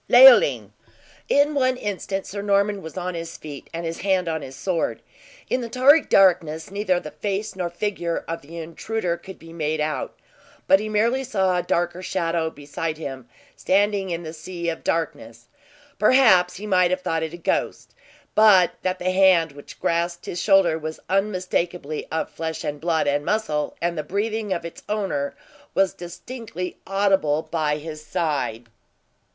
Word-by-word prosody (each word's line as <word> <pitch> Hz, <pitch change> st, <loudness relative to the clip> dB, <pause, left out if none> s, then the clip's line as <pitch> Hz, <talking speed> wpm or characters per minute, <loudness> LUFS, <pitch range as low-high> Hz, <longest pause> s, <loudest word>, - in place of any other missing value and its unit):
LEOLINE. -, -, +7 dB, 0.6 s
In 285 Hz, +1 st, +4 dB
one 255 Hz, -2 st, +2 dB
instant 195 Hz, -3 st, -3 dB
Sir 200 Hz, +1 st, -5 dB
Norman 200 Hz, 0 st, +1 dB
was 160 Hz, +2 st, -9 dB
on 180 Hz, 0 st, -3 dB
his 165 Hz, 0 st, -6 dB
feet 145 Hz, -3 st, -9 dB
and 170 Hz, 0 st, -5 dB
his 165 Hz, 0 st, -4 dB
hand 190 Hz, -2 st, +1 dB
on 160 Hz, -1 st, -2 dB
his 135 Hz, -1 st, -9 dB
sword. 180 Hz, 0 st, -1 dB, 0.5 s
In 255 Hz, -, 0 dB
the 235 Hz, -, -5 dB
tarry 270 Hz, +6 st, +6 dB
darkness, 170 Hz, -, +3 dB
neither 195 Hz, -3 st, +1 dB
the 150 Hz, -, -9 dB
face 205 Hz, +1 st, -3 dB
nor 180 Hz, -2 st, -2 dB
figure 175 Hz, -2 st, -3 dB
of 165 Hz, 0 st, -4 dB
the 165 Hz, +4 st, -11 dB
intruder 170 Hz, +3 st, -3 dB
could 190 Hz, +2 st, -11 dB
be 165 Hz, 0 st, -13 dB
made 155 Hz, -1 st, -2 dB
out, 150 Hz, -3 st, -2 dB, 0.5 s
but 190 Hz, -, +6 dB
he 215 Hz, +1 st, -4 dB
merely 230 Hz, +5 st, +1 dB
saw 190 Hz, -7 st, +1 dB
a 180 Hz, -, +1 dB
darker 175 Hz, +1 st, -1 dB
shadow 170 Hz, -3 st, -1 dB
beside 155 Hz, +2 st, -5 dB
him 135 Hz, -5 st, -7 dB, 0.3 s
standing 200 Hz, 0 st, +1 dB
in 170 Hz, 0 st, -3 dB
the 160 Hz, 0 st, -7 dB
sea 170 Hz, +1 st, -5 dB
of 165 Hz, -, -5 dB
darkness. 115 Hz, -8 st, -3 dB, 0.5 s
Perhaps 210 Hz, -6 st, +5 dB
he 205 Hz, -, -7 dB
might 185 Hz, -3 st, +3 dB
have 185 Hz, +1 st, -1 dB
thought 165 Hz, -2 st, -1 dB
it 160 Hz, 0 st, -3 dB
a -, -, -10 dB
ghost, 170 Hz, -, -2 dB, 0.4 s
but 205 Hz, -5 st, +6 dB
that 185 Hz, 0 st, -1 dB
the 185 Hz, 0 st, -1 dB
hand 185 Hz, -4 st, +4 dB
which 145 Hz, 0 st, -13 dB
grasped 170 Hz, +1 st, -1 dB
his 175 Hz, -, -4 dB
shoulder 195 Hz, -5 st, +4 dB
was 155 Hz, 0 st, -6 dB
unmistakably 180 Hz, -5 st, -1 dB
of 160 Hz, -, -1 dB
flesh, 160 Hz, -1 st, -4 dB
and 145 Hz, 0 st, -4 dB
blood, 165 Hz, -2 st, +1 dB
and 145 Hz, +1 st, +1 dB
muscle, 155 Hz, -7 st, -1 dB
and 170 Hz, 0 st, -1 dB
the 155 Hz, -, -2 dB
breathing 210 Hz, +5 st, -2 dB
of 170 Hz, -2 st, -2 dB
its 170 Hz, -, -8 dB
owner 195 Hz, -10 st, -2 dB, 0.4 s
was 195 Hz, -1 st, +3 dB
distinctly 180 Hz, +1 st, -7 dB
audible 195 Hz, -6 st, +2 dB
by 155 Hz, -2 st, -1 dB
his 155 Hz, 0 st, -8 dB
side. 150 Hz, -8 st, -2 dB
175 Hz, 170 wpm, -23 LUFS, 160-200 Hz, 0.6 s, LEOLINE